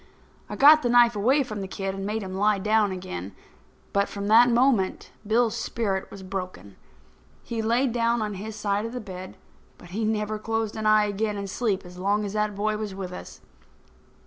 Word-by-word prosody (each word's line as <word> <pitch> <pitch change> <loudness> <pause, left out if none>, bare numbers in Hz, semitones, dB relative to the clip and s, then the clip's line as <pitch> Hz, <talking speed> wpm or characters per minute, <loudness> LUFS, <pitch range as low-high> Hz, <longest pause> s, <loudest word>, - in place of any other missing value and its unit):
I - - -5
got 305 +2 +7
the 245 - 0
knife 240 -1 +5
away 260 +8 +3
from 215 -5 -6
the 190 - -4
kid 195 0 -4
and 195 0 -5
made 215 +1 -2
him 185 -1 -6
lie 205 +2 +2
down 210 +1 +2
again. 100 - -6 0.6
But, 200 0 +1
from 200 0 -4
that 235 +3 +7
moment, 235 -5 +1 0.2
Bill's 225 +1 +2
spirit 195 -5 -2
was 195 - -10
broken. 185 - -6 0.7
He 230 -1 -3
laid 235 +4 +1
down 235 0 +1
on 210 -1 -2
his 210 +3 -7
side 205 -1 -1
of 230 - -9
the 250 - -4
bed, 185 -4 -9 0.4
but 175 - -15
he 210 +5 -3
never 215 0 -1
closed 225 0 -2
an 215 -1 -2
eye 215 0 +5
again 210 +1 -2
in 200 - -4
sleep 200 -1 -2
as 180 0 -11
long 205 +3 +1
as 200 - -5
that 210 -1 -1
boy 215 +1 -1
was 210 -3 -5
with 190 -2 -6
us. - - -10
210 Hz, 200 wpm, -25 LUFS, 195-225 Hz, 0.7 s, got